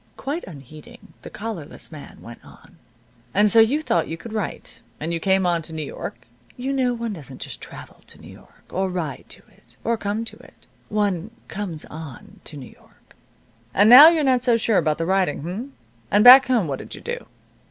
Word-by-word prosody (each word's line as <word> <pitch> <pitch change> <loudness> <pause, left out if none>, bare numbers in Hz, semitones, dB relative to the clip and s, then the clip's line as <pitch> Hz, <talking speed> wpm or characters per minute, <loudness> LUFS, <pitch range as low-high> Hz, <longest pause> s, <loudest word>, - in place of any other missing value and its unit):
Quite 290 +5 -4
unheeding, 155 - -14
the - - -10
collarless 205 -10 -7
man 155 -3 -12
went 120 0 -12
on, - - -18 0.6
"And 205 +1 +4
so 230 - +5
you 265 +8 +3
thought 170 - 0
you 165 - -5
could 215 +6 -10
write, 215 -4 -5 0.2
and 165 +2 -3
you 165 - -2
came 190 +1 +2
on 170 -1 +1
to 160 +1 -11
New 155 -1 -4
York - - -8 0.3
(you 260 +2 -3
know 255 -2 0
one 230 -2 -4
doesn't 135 -7 -11
just - - -7
travel - - -11
to - - -16
New - - -13
York, - - -20
or 190 +1 -1
ride 170 -6 -5
to - - -10
it, 120 +1 -24
or 230 0 0
come 210 +2 -3
to - - -9
it; - - -19 0.2
one 205 -3 -1 0.2
'comes 185 -7 -5
on' 155 -5 -11
to 150 - -9
New 130 - -10
York), - - -25 0.6
and 210 +3 +5
now 280 +5 +12
you're 325 -2 +3
not 260 -3 +2
so 240 -2 +2
sure 225 -2 +2
about 155 -1 0
the 165 - -2
writing, 185 -5 0
h'm? 205 - -6 0.4
And 205 +1 +4
back 260 +2 +10
home 235 -9 +1
what 135 -2 -4
did - - -8
you - - -11
do?" 480 +1 -6
200 Hz, 205 wpm, -22 LUFS, 160-235 Hz, 0.6 s, now